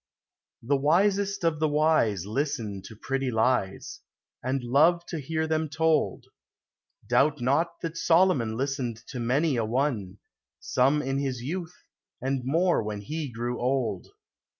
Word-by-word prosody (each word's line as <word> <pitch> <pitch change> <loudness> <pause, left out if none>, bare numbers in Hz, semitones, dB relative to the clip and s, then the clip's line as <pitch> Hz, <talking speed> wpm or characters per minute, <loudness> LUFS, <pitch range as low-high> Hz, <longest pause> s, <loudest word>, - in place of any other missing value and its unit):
The 140 +4 +2
wisest 195 +7 +2
of 165 -2 +1
the 155 - +2
wise 145 - +2
Listen 110 -4 -2
to 110 - -11
pretty 135 +4 -2
lies, 110 -4 0 0.4
And 130 +1 -2
love 160 +8 +3
to 165 - -3
hear 160 +3 -2
them 160 -1 -1
told; 160 +1 +1 0.8
Doubt 150 +1 +2
not 155 +7 0
that 165 -1 -4
Solomon 165 -12 +3
Listened 130 -3 -2
to 130 - -5
many 135 +4 +1
a 115 - +1
one, 110 -5 -1 0.2
— - - -66
Some 140 +4 +2
in 135 +1 -1
his 130 -4 -3
youth, 170 +4 -5 0.4
and 135 0 -1
more 165 +6 +2
when 105 -1 -4
he 150 +5 -4
grew 120 +1 -3
old. 125 -7 -1
135 Hz, 145 wpm, -27 LUFS, 120-160 Hz, 0.8 s, love